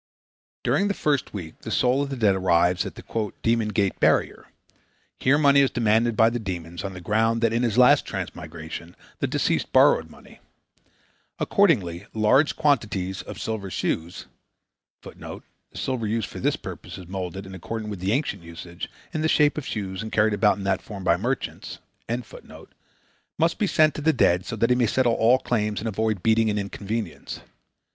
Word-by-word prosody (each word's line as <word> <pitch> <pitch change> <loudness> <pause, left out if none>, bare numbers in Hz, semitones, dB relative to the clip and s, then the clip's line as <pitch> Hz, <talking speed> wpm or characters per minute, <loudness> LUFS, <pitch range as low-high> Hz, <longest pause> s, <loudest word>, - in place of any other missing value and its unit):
During 200 - +2
the 200 - -1
first 145 -4 0
week 85 -6 -8
the - - -8
soul 125 +2 +2
of 140 - -2
the 135 - -3
dead 110 -5 +3
arrives 90 -1 +2
at - - -9
the - - -11 0.4
"Demon 115 -1 +2
Gate 100 -3 0
Barrier." - - +1 0.7
Here 140 +3 +3
money 140 -2 +5
is 135 -1 +4
demanded 115 -1 +1
by 115 +1 +5
the 120 - -2
demons 85 -5 -5
on 95 -1 -4
the 90 - -9
ground 110 +4 +1
that 115 -1 +2
in 115 - +1
his 120 -2 0
last 125 0 +6
transmigration 80 +2 -7 0.2
the - - 0
deceased - - 0
borrowed - - +4
money. - - -16 1.0
Accordingly 100 - +1
large 130 +7 +3
quantities 105 - 0
of - - -9
silver 110 -3 -4
shoes 85 -1 -3 0.8
[Footnote: - - -9 0.3
The - - -12
silver 125 -4 -2
used 110 -1 -1
for - - -8
this - - +1
purpose - - -9
is 90 -3 -10
molded, 95 +1 -5
in 95 - -10
accordance 105 +4 -5
with 95 -3 -7
ancient 115 - 0
usage, 85 +1 -8 0.2
in 155 - -1
the 160 - +1
shape 150 -1 +4
of 150 - -5
shoes 95 -3 -4
and 110 0 -6
carried 110 0 +3
about 105 -1 +3
in 100 - -6
that 95 -1 0
form 100 -3 -8
by 90 - +4
merchants.] 125 +8 -4 1.6
must 165 +1 +1
be 205 - +2
sent 155 -4 +4
to - - -6
the 160 +2 +3
dead 90 -8 +2
so 115 - -3
that 115 +3 +1
he - - +5
may 125 -2 +2
settle 120 +1 +2
all 115 +3 +4
claims 105 -5 -1
and 115 - -4
avoid 110 -2 -1
beating 110 0 +3
and 105 - -1
inconvenience. 100 -1 -5
110 Hz, 185 wpm, -24 LUFS, 95-125 Hz, 1.6 s, last